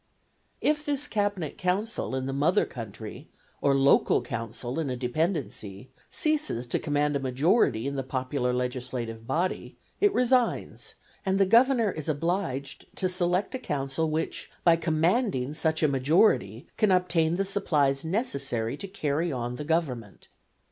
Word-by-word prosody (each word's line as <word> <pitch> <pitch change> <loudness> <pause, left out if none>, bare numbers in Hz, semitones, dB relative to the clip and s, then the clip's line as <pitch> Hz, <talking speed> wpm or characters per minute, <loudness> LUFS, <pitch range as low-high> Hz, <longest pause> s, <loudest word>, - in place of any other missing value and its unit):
If 300 0 +1
this 290 -1 -1
cabinet 205 -7 -2
council 185 - -1
in 130 0 -2
the 135 - -3
mother 150 +6 +2
country, 115 +3 -8 0.3
or 140 -1 +3
local 135 0 +4
council 120 +5 -4
in 155 -4 -1
a 125 - -2
dependency, 125 - -3 0.2
ceases 305 - 0
to 120 - -1
command 145 -1 0
a - - +1
majority 135 - +2
in 140 0 -2
the - - 0
popular 130 0 -2
legislative 125 -2 -3
body, 170 +7 -2 0.2
it 410 0 +4
resigns, 250 -5 0 0.3
and 190 -1 +1
the 195 - +5
Governor 235 +1 +4
is 155 -2 -5
obliged 155 -3 -2
to 185 - +1
select 180 +1 0
a 260 - -3
council 145 - -2
which, 160 +1 -3
by 170 -1 +6
commanding 160 - +1
such 160 +1 0
a - - +6
majority, 135 - +2
can 215 - +3
obtain 170 -3 +2
the 195 +2 0
supplies 150 -9 +1
necessary 140 - -1
to 195 - -6
carry 165 -3 -1
on 125 -2 -3
the 150 - -4
government. 140 - -2
150 Hz, 150 wpm, -27 LUFS, 130-185 Hz, 0.3 s, by